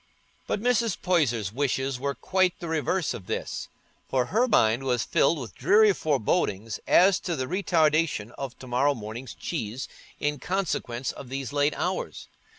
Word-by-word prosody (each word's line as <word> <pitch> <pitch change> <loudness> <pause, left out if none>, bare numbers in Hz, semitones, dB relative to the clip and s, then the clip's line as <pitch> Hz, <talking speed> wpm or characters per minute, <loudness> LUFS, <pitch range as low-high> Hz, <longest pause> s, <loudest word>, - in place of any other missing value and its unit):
But - - -1
Mrs. 235 -2 +1
Poyser's 120 - +1
wishes 135 -1 -1
were 140 +1 -2
quite 185 -1 +1
the 170 - -6
reverse 160 +1 0
of 95 - -9
this, - - -4 0.4
for 130 -2 +1
her 240 +4 +4
mind 115 - +3
was 125 -3 0
filled 160 +4 +2
with 125 -6 -7
dreary 210 -1 +5
forebodings 110 - 0
as 190 +1 +5
to 175 - -3
the 130 - -2
retardation 160 - +1
of 135 -1 -7
to - - -11
morrow 130 +4 +2
morning's 115 +3 -7
cheese 125 -6 -4 0.3
in 145 -1 -1
consequence 145 -10 -2
of 130 - -10
these 135 0 -4
late 145 +1 +2
hours. - - -3
140 Hz, 155 wpm, -26 LUFS, 125-175 Hz, 0.4 s, dreary